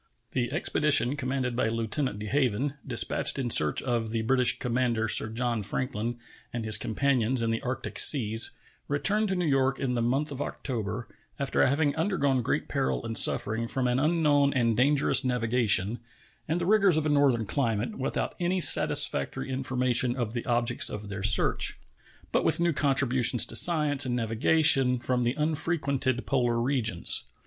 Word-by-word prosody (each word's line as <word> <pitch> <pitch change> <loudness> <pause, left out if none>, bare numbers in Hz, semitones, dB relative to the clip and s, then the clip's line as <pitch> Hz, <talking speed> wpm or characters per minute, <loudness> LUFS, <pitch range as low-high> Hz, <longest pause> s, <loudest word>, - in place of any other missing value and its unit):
The 125 -1 -3
expedition 145 -4 +1
commanded 130 -3 -4
by 120 - -1
Lieutenant 115 +2 -3
De 105 - -8
Haven, 130 +2 -2
dispatched 120 +2 +3
in 125 -3 -4
search 75 -6 +4
of 120 -3 -3
the 110 0 -4
British 125 +2 +2
commander 120 -2 -2
Sir 110 - +3
John 120 0 -3
Franklin 120 +2 -4 0.3
and 115 -1 -6
his 110 - +2
companions 125 0 -2
in 115 - -2
the 115 - -4
Arctic 130 +1 -5
Seas, 115 -5 +4 0.4
returned 195 +10 0
to 190 - -2
New 180 -1 -3
York 135 -2 -1
in 130 -2 -3
the 120 - -2
month 135 +6 -2
of 140 0 -7
October, 115 -5 -6 0.3
after 140 -1 -1
having 145 +1 0
undergone 155 -7 -1
great - - -3
peril 65 -2 -3
and 115 - -6
suffering 110 +2 +1
from 130 +1 -3
an 125 +1 -1
unknown 150 -2 0
and 115 -3 0
dangerous 135 +1 +3
navigation 120 -3 +1 0.5
and 160 +3 -2
the 175 - -3
rigors 195 -4 +2
of 155 - -2
a - - 0
northern 140 -6 +1
climate, 115 -1 -3
without 135 - -4
any 180 +1 -2
satisfactory 145 - +4
information 130 -2 0
of 120 -4 -5
the 120 - -6
objects 120 -1 -1
of 105 -1 -8
their 100 0 -7
search, 105 +1 +2 0.5
but - - -1
with - - +1
new 170 -1 0
contributions 130 -4 +1
to - - -7
science 150 -5 +5
and 120 - -3
navigation 125 +3 +2
from 125 +1 -3
the 120 +2 -2
unfrequented 145 -5 -2
polar 120 -3 -1
regions. 115 - -1
125 Hz, 165 wpm, -26 LUFS, 115-140 Hz, 0.5 s, science